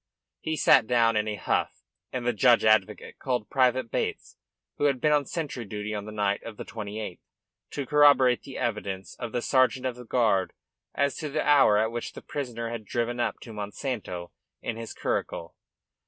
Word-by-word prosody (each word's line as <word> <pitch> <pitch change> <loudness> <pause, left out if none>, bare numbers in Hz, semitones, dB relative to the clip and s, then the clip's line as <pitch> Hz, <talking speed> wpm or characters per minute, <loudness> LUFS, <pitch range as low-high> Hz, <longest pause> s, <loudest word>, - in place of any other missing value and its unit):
He 160 - -2
sat 110 - +5
down 115 -2 +3
in 105 0 +1
a 105 - -2
huff, - - -1 0.3
and 125 -2 -4
the 120 - +2
judge 120 +2 +4
advocate 110 -1 +2
called 125 -5 -2
Private 130 -2 +2
Bates, - - -3 0.4
who 145 - +2
had 140 -3 +2
been 150 - +2
on 145 -3 +2
sentry 150 -7 -4
duty 105 0 -5
on 105 -1 -4
the 105 - -7
night 100 -1 0
of 110 -2 -9
the - - -6
28th, 105 -3 -6 0.5
to 140 - -4
corroborate 140 -3 +5
the 135 - -9
evidence 100 -4 -3
of 115 - -4
the 120 - -2
sergeant 130 -1 +2
of 125 -2 -1
the 125 - -10
guard 110 -6 +1 0.4
as 140 0 +1
to 155 - -4
the 155 +2 -1
hour 140 -8 +6
at 110 +2 +1
which 120 0 -5
the - - -10
prisoner 120 -5 -4
had 115 -2 -5
driven 120 +3 -2
up 120 - -1
to 115 - -9
Monsanto 105 -4 -5 0.3
in 115 - -4
his 115 0 -7
curricle. 85 0 -3
115 Hz, 190 wpm, -27 LUFS, 105-130 Hz, 0.5 s, hour